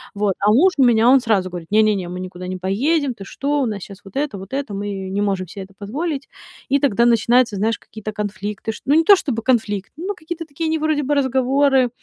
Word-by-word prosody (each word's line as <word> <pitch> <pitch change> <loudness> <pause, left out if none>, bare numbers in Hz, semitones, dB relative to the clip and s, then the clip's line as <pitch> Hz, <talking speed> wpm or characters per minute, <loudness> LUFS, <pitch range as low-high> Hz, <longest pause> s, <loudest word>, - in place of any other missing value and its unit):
Вот, 200 -2 0
а 205 +1 +3
муж 350 - +5
у 275 - +5
меня, 235 -1 +5
он 270 +1 +7
сразу 210 -6 +1
говорит: 175 -2 -8
"Не 215 +1 +5
не 215 -1 +3
не, 185 -3 -4
мы 180 +1 -6
никуда 180 0 -7
не 185 0 -4
поедем, 260 - 0
ты 200 -4 -10
что, 285 +7 -1
у - - +1
нас 210 -5 -4
щас 200 0 -11
вот 195 - -14
это, 275 -6 -2
вот 195 +5 -10
это, 275 -5 -3
мы 195 -1 -4
не 200 +2 -1
можем 195 -2 -1
се 195 - -10
это 195 +1 -11
позволить". 275 +8 -4 0.4
И 280 +1 +3
тогда 235 -5 +2
начинаются, 235 0 +3
знаешь, 220 +2 0
какие-то 215 0 -8
конфликты 210 +1 -4
шт - - -11
ну, 285 - +3
не 325 - +5
то 400 +5 +8
чтобы 260 - -3
конфликты, 215 -6 0
но 375 +5 -3
какие-то 330 -1 -7
такие 315 +2 -4
не 320 - +1
вроде 305 -1 0
бы 285 +2 0
разговоры, 265 0 +2
225 Hz, 245 wpm, -20 LUFS, 200-280 Hz, 0.4 s, то